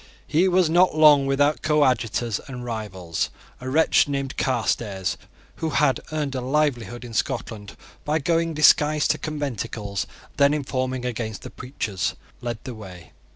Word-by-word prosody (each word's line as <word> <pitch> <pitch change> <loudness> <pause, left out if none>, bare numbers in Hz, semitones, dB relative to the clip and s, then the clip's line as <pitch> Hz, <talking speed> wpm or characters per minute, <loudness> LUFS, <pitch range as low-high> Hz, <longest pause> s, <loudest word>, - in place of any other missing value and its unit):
He 165 +5 +2
was 185 -1 +3
not 175 +1 +4
long 150 -3 +7
without 145 +2 +2
coadjutors 125 -7 +1
and 125 -2 -7
rivals. 95 -8 -3 0.3
A 130 - -5
wretch 160 +2 +4
named 140 -1 -3
Carstairs, 110 -6 -1 0.4
who 160 - -2
had 145 -2 +2
earned 150 -3 -2
a 130 - -2
livelihood 125 -4 -1
in 120 - -9
Scotland 105 -2 -3 0.3
by 150 +1 +1
going 165 +1 0
disguised 150 0 +4
to 155 - -2
conventicles 120 -9 -3 0.3
and - - -31
then 140 0 +5
informing 130 -3 -2
against 110 -4 -4
the - - -8
preachers, 110 -8 -3 0.3
led 120 -2 -3
the 130 - -6
way. 95 -6 -11
130 Hz, 150 wpm, -24 LUFS, 115-150 Hz, 0.4 s, long